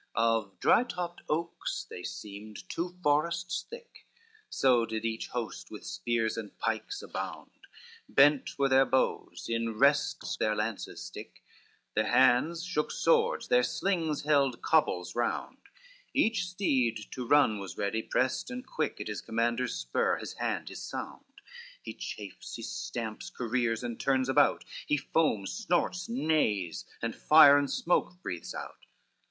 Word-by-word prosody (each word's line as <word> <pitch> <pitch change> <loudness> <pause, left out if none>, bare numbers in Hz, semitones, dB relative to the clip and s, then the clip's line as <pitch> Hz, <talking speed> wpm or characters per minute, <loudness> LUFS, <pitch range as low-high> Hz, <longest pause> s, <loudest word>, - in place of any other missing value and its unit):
XXIX - - -37
Of 115 -3 +1
dry 235 - +5
topped 180 -7 -5
oaks 165 +2 -2
they 90 - -8
seemed 105 - -8
two 175 +1 -4
forests 170 +4 +1
thick, 475 +1 -12 0.4
So 125 -3 +3
did 110 0 -3
each 115 0 -2
host 120 -2 -5
with - - -9
spears 115 -2 -1
and 110 -3 -7
pikes 115 - -2
abound, - - -6 0.6
Bent 145 0 +4
were 140 -1 +3
their 135 0 +5
bows, 130 - 0
in 115 -1 -2
rests 140 +4 +2
their 110 0 +1
lances 105 - -3
stick, - - -10 0.5
Their - - +1
hands 160 +8 +4
shook 150 -4 -1
swords, 470 0 +2
their 245 0 +5
slings 170 - -1
held 140 -4 +2
cobbles 90 - +2
round: 120 0 -2 0.6
Each 215 -5 +2
steed 130 - 0
to 125 -2 -5
run 130 -7 +4
was 95 -2 -7
ready, 110 +3 -1
prest 130 - 0
and 255 0 -6
quick, 155 - -2
At - - -5
his 105 -1 -4
commander's 115 - 0
spur, - - 0
his - - -6
hand, - - -2
his - - -8
sound, - - -6 0.6
He - - -6
chafes, 100 -3 -7
he - - -7
stamps, 110 -3 -5
careers, 120 -1 -1
and 120 -2 -4
turns 130 -1 +1
about, 145 +1 +3 0.2
He 150 - +2
foams, 135 -8 0
snorts, 180 -2 -1
neighs, 110 - 0 0.2
and 115 -1 -2
fire 150 -2 +8
and 140 -1 -1
smoke 180 +1 0
breathes 90 -2 -5
out. - - -8
130 Hz, 145 wpm, -30 LUFS, 110-165 Hz, 0.6 s, fire